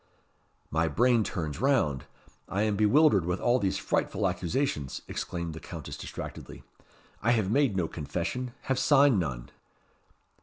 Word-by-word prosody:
"My 80 +2 +1
brain 120 - +3
turns 80 -5 -4
round. 100 - +2 0.4
I 100 +2 0
am 105 -1 +1
bewildered 105 - +4
with 90 +2 -2
all 120 +1 +2
these 95 -4 0
frightful - - 0
accusations," 85 - -2
exclaimed 85 -2 -4
the 80 - -7
Countess - - -8
distractedly. - - -8 0.6
"I 120 +3 +3
have 105 -4 +1
made 135 -6 +2
no 85 -3 +1
confession, 90 - -4
have 135 -1 -1
signed 140 -6 +5
none." 65 -8 -4
100 Hz, 140 wpm, -28 LUFS, 80-125 Hz, 0.6 s, signed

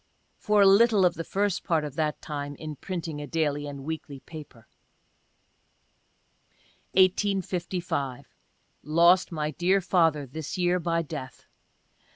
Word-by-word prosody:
(For 210 -1 +3
a - - +6
little 200 0 +5
of 180 - +3
the 165 - -5
first 200 +1 -1
part 165 -4 +1
of 150 -3 -5
that 155 -1 -2
time 145 -1 -5
in 155 +1 -7
printing 165 -3 -5
a 145 - -6
daily 145 -1 -1
and 140 -1 -7
weekly 150 -2 -6
paper.) 145 -8 -12 2.3
1855. 180 -7 0 0.4
— - - -43
Lost 170 +5 +4
my 150 -2 -2
dear 185 +4 +2
father, 165 -5 +2
this 150 +5 -6
year, 180 0 +2
by 165 0 0
death. 145 -4 -8
165 Hz, 135 wpm, -27 LUFS, 145-185 Hz, 2.3 s, a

